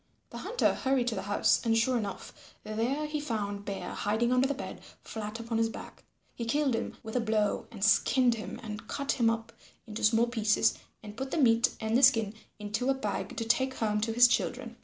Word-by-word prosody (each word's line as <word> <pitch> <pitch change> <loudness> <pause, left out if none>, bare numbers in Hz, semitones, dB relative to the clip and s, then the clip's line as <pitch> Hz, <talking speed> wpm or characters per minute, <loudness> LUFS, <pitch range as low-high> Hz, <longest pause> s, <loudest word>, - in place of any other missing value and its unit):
The - - -7
Hunter - - +1
hurried 260 -2 0
to - - -3
the 190 - -3
house, 205 +1 +2
and 225 -1 +2
sure 250 +3 +2
enough 205 -5 -6
there 235 +8 -1
he 300 0 -3
found 205 -7 -3
Bear 200 -1 -5
hiding 225 +4 0
under 255 +1 +3
the 285 - -2
bed, 285 - -7 0.2
flat 220 0 -6
upon 230 0 -2
his 225 0 +2
back. - - -10 0.3
He 235 - -5
killed 270 +3 +1
him 230 - -3
with 220 +1 -7
a - - +3
blow 220 -2 0
and 215 -4 -7
skinned 245 +2 +4
him 225 -1 -6
and 215 -1 -7
cut 280 -1 -2
him 235 -3 +2
up 225 0 -3 0.3
into 220 -2 -7
small 225 +2 +4
pieces 220 -3 +2 0.3
and 210 -1 -9
put 265 +3 -4
the - - -2
meat 230 -5 +3
and 220 +1 -1
the 255 - +4
skin 225 -6 +5 0.2
into 215 +5 -2
a 270 - +3
bag 265 - -4
to 230 - -2
take 260 +3 +1
home 210 -3 0
to 225 +1 0
his 240 +2 +7
children. 240 0 -1
230 Hz, 215 wpm, -29 LUFS, 215-255 Hz, 0.3 s, his